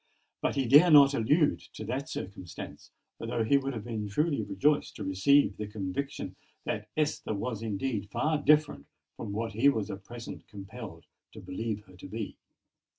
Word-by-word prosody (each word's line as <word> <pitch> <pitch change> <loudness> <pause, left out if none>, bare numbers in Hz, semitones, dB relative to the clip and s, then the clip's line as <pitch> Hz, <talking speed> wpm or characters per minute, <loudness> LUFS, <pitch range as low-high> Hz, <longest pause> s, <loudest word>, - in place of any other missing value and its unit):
But - - 0
he 135 -2 +1
dared 150 +7 +7
not 140 -1 +9
allude 145 +6 +3 0.2
to 110 - -6
that 135 +7 -3
circumstance; 90 -2 -7 0.3
although 115 - -1
he 140 +6 +4
would 135 0 -3
have 110 -3 -5
been 110 -3 -4
truly 150 +4 +1
rejoiced 105 +9 +1
to - - -5
receive 100 +4 +3
the 105 - -4
conviction 105 +6 -4 0.3
that 105 +1 -3
Esther 150 -7 0
was 115 +1 -3
indeed 110 -1 -2
far 150 +7 +1
different 150 - +3 0.3
from 110 - -6
what 115 +2 -2
he 115 +7 +4
was 110 -6 -1
at 95 0 -7
present 120 +2 -9
compelled 100 -3 -9 0.3
to - - -9
believe 110 +1 -4
her 95 - -17
to - - -9
be. 110 +1 -5
115 Hz, 170 wpm, -30 LUFS, 100-140 Hz, 0.3 s, not